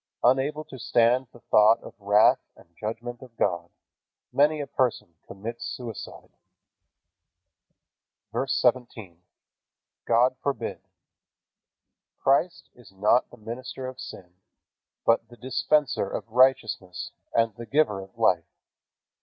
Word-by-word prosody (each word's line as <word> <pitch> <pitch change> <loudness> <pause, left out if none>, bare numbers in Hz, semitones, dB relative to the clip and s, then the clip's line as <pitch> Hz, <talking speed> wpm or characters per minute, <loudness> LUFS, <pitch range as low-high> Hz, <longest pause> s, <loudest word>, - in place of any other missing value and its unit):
Unable 135 +5 +2
to 130 - -11
stand 120 +3 +3
the 120 - -17
thought 110 +2 +5
of - - -11
the 100 - -24
wrath 105 +2 +5 0.2
and 85 0 -21
judgment 115 +4 -5
of 125 -3 -14
God, 90 -3 0 0.6
many 150 +2 +3
a 145 - -2
person 125 -11 -1
commits 115 +4 -7
suicide. 120 -5 -7 2.0
VERSE 135 0 -1
17. 115 -8 -1 0.9
God 120 +2 +4
forbid. 140 -1 -3 1.4
Christ 155 +6 +1
is 120 -6 -18
not 105 +6 +2
the - - -15
minister 125 +4 -7
of 130 0 -7
sin, 90 -2 -10 0.7
but 115 0 +3
the 120 - -15
Dispenser 130 -3 +1
of - - -5
righteousness 115 -8 +2 0.2
and 115 -1 +3
the 115 0 -9
Giver 110 -6 +2
of 95 +3 -14
life. 95 -8 +2
120 Hz, 120 wpm, -26 LUFS, 105-130 Hz, 2.0 s, thought